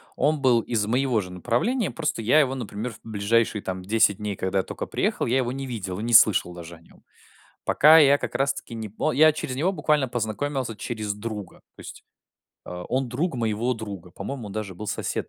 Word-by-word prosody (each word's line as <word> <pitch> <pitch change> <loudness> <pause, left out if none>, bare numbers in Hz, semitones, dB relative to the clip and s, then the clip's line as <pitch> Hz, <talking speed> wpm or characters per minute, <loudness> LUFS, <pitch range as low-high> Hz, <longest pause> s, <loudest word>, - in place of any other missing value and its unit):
Он 150 +2 +1
был 125 -4 +4
из 110 -3 -1
моего 125 +1 +1
же 90 -3 -6
направления, 180 - 0
просто 150 -8 -2
я 125 +8 +4
его, 135 -3 +2
например, 115 -1 -5
в - - -15
ближайшие 110 0 0
там 95 0 -4
10 100 0 +2
дней, 105 -2 -4
когда 95 +1 0
только - - -6
приехал, - - -1
я 125 +3 +1
его 125 -1 0
не 135 +1 -5
видел 100 -7 -5
и - - -4
не 120 0 -2
слышал 100 -5 +6
даже 85 -1 -9
о 85 - -19
нём. - - -22 0.6
Пока 155 +2 +6
я 140 -1 +6
как - - -5
раз-таки 135 -3 -2
не 110 -2 -5
по 105 - -1
Я 155 +4 +6
через 130 -4 -4
него 170 +8 +1
буквально 150 -7 +1
познакомился 120 +2 -3
через 105 -2 -4
друга. 105 -2 -7 0.2
То - - -21
есть - - -11 0.6
а, 90 0 -7
он 130 0 -1
друг 145 +6 -2
моего 115 +1 -1
друга. 100 -6 -8
По-моему, 135 -6 -6
он 100 - -8
даже 100 -4 -5
был 105 - -7
сосед - - -3
115 Hz, 210 wpm, -25 LUFS, 105-135 Hz, 0.6 s, слышал